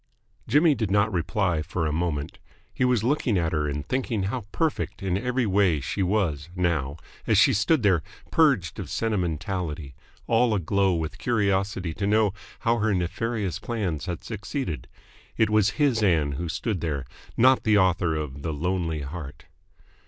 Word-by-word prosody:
Jimmy 150 +1 +5
did 110 -7 -2
not 100 +2 +2
reply 90 -1 0
for 85 +1 -2
a 75 - 0
moment. 80 -3 -2 0.3
He - - -1
was 125 -4 +2
looking 125 -4 +1
at 85 -2 0
her 75 -2 0
and 70 0 -4
thinking 120 -2 -1
how 105 +2 -3
perfect 160 -10 -2
in 95 -2 0
every 125 +4 0
way 95 -6 +3
she 70 +9 -3
was 90 -6 0
now, 80 -6 0 0.3
as - - +4
she - - +6
stood 140 +5 +2
there 95 -5 +4 0.3
purged 135 - +2
of - - -5
sentimentality, 85 -7 -2 0.3
all 115 -1 +3
aglow 95 +1 +1
with 80 -2 -4
curiosity 100 -6 0
to 100 +4 -2
know 105 -1 +3 0.3
how 115 0 +2
her 105 -1 +1
nefarious 95 +2 -2
plans 95 -9 -3
had 90 -2 -4
succeeded. 105 - -4 0.5
It 110 -1 +3
was 105 -1 +4
his 135 -6 +2
Ann 80 -8 +2
who 85 +5 -4
stood 90 +3 -2
there, 75 -5 -2 0.3
not 130 +2 +5
the 105 -1 +3
author 90 -4 +2
of 70 -3 -4
"The 80 +1 -3
Lonely 80 0 -1
Heart." 70 +1 -8
95 Hz, 165 wpm, -25 LUFS, 80-110 Hz, 0.5 s, she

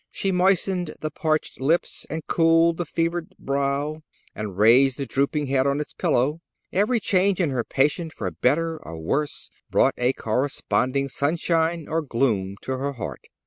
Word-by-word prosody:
She 195 - -2
moistened 180 -2 +1
the 155 - -3
parched 155 -2 -1
lips, 160 +6 0
and 160 0 -4
cooled 165 0 +3
the 175 - -2
fevered 165 +2 -2
brow, 140 +2 -1 0.3
and 105 -4 -6
raised 125 +5 +5
the 140 - -3
drooping 140 +3 0
head 135 0 +1
on 140 +1 +1
its 150 - -5
pillow. 140 +6 +1 0.3
Every 215 +5 +2
change 195 -1 +2
in 165 -6 +1
her 125 -3 -1
patient 150 +6 0
for 95 - -4
better 160 - 0
or 80 +1 -8
worse 145 - -2 0.2
brought - - +3
a 125 +2 +2
corresponding 130 +3 0
sunshine 160 +3 0
or 165 +1 0
gloom 115 -9 0
to 130 0 -3
her 140 +1 -2
heart. 120 - -7
145 Hz, 160 wpm, -24 LUFS, 130-165 Hz, 0.3 s, raised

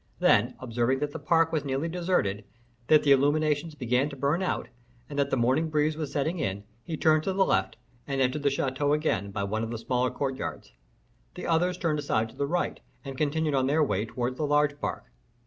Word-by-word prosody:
Then, - - +3
observing 120 +1 0
that 145 +1 -2
the - - -6
park 165 +2 +2
was 155 -3 0
nearly 140 +3 -1
deserted, 170 - 0 0.4
that 155 -1 +5
the 145 - +3
illuminations 150 +3 +2
began 125 +1 +1
to 140 - -8
burn 140 +6 0
out, 185 - -1 0.4
and 145 -1 -4
that 140 0 +2
the 135 - 0
morning 130 +7 +2
breeze 155 0 +1
was 155 -2 -4
setting 160 +5 -1
in, 100 -3 -2 0.2
he 160 +2 -4
turned 155 -1 +4
to 190 - 0
the 190 0 +3
left, - - 0 0.3
and 135 -1 -2
entered 130 +3 +1
the 140 - +3
chateau 140 +1 0
again, 150 -10 0
by 100 0 -3
one 110 +3 -2
of 115 - -3
the 115 - -4
smaller 125 +2 0
courtyards. 135 -1 -4 0.6
The - - -6
others 175 +2 +1
turned 160 -4 0
aside 115 -6 0
to - - -16
the 140 - -1
right, 175 +4 -1 0.3
and 135 -1 -6
continued 150 +2 0
on 130 -1 +2
their 155 +3 +3
way 105 -7 0
towards 125 +2 -3
the 150 - -1
large 145 0 +2
park. - - -3
145 Hz, 215 wpm, -27 LUFS, 130-155 Hz, 0.6 s, that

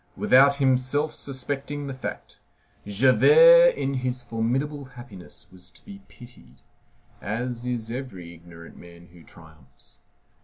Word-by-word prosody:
Without 140 +2 +4
himself 135 +2 0
suspecting 140 +1 -6
the 135 - -6
fact, 130 - -9 0.5
Javert 480 - +5
in 135 - -3
his 125 -1 -4
formidable 130 +6 -3
happiness 120 -8 -12
was 90 -1 -12
to 90 - -22
be 200 -1 -12
pitied, 125 -1 -18 0.6
as 120 +3 -5
is 115 -2 -4
every 100 -10 -8
ignorant 85 0 -15
man 85 0 -16
who 85 -1 -18
triumphs. 80 -7 -18
125 Hz, 120 wpm, -24 LUFS, 95-140 Hz, 0.6 s, Javert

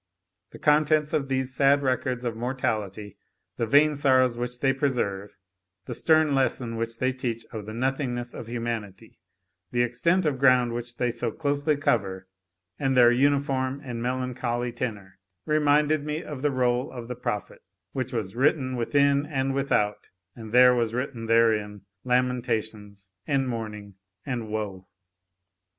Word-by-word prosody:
The - - -12
contents 150 0 +2
of 140 -2 0
these 130 -1 -1
sad 140 +1 +3
records 130 -1 -1
of 115 -2 -2
mortality, 110 -5 -3 0.4
the 115 - -1
vain 150 +5 +5
sorrows 130 -3 +3
which 120 +1 -4
they 135 0 +2
preserve, 120 -8 -2 0.5
the - - -5
stern 155 -2 +3
lesson 130 -3 0
which 115 0 -3
they 130 +1 0
teach 115 -3 -4
of 105 -2 -7
the 110 - -6
nothingness 125 -1 -2
of 115 - -8
humanity, 115 -3 -5 0.5
the 120 0 +1
extent 170 +10 +1
of 140 -4 0
ground 125 -3 +4
which 120 0 -6
they 125 -1 0
so 115 0 -3
closely 145 +2 0
cover, 95 -8 -1 0.5
and 135 -2 +1
their 120 -1 +7
uniform 135 0 +1
and 120 -3 -5
melancholy 125 -1 -2
tenor, 105 -6 -6 0.3
reminded 150 0 +2
me 150 +3 -3
of 145 -4 -7
the 145 - +2
roll 125 -1 0
of 120 -3 -8
the 125 - -4
prophet, 105 -4 -4 0.3
which 130 -2 -3
was 110 -5 -4
"written 130 0 +1
within 140 +4 +2
and 135 -2 -1
without, 120 -7 0 0.3
and 110 -2 -9
there 125 +1 +7
was 115 -2 0
written 125 -3 -4
therein 110 -3 +2 0.2
lamentations 110 -6 -2 0.2
and 135 -3 +1
mourning 105 -4 -5 0.3
and 120 -5 -4
woe." 100 -3 -4
125 Hz, 150 wpm, -26 LUFS, 115-135 Hz, 0.5 s, their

